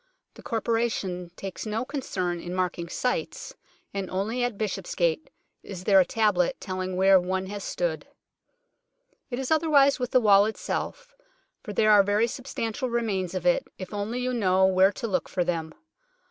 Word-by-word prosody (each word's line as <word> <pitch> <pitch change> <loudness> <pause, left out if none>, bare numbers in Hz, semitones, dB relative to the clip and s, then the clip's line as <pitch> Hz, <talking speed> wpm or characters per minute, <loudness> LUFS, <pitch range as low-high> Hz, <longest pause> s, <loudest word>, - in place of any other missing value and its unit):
The - - -14
Corporation 225 -6 -1
takes 195 0 -6
no 220 +3 -2
concern 190 - -3
in 175 +1 -6
marking 175 -2 -2
sites, 250 +7 -3 0.4
and 195 -2 -3
only 220 +6 -1
at 245 -4 -2
Bishopsgate 175 -6 -1 0.3
is 185 -3 -8
there 195 0 +5
a 185 - +5
tablet 210 +3 +1
telling 185 -1 -4
where 190 +1 +6
one 185 +1 -2
has 200 +1 -6
stood. 170 -3 -2 1.2
It 245 - -3
is 265 +1 -4
otherwise 295 -4 +4
with 250 -1 -2
the 255 - +4
wall 205 -3 +6
itself, - - -4 0.5
for - - -7
there 215 +1 +3
are 205 -1 +8
very 205 +3 +2
substantial 250 0 -4
remains 200 -6 -1
of 180 -1 -3
it, 175 - +2
if 185 +1 -8
only 210 +4 -3
you 250 0 -1
know 190 -5 +3
where 190 +1 +4
to 230 - -5
look 185 -5 -1
for 180 - 0
them. 165 -2 -2
200 Hz, 165 wpm, -26 LUFS, 185-235 Hz, 1.2 s, are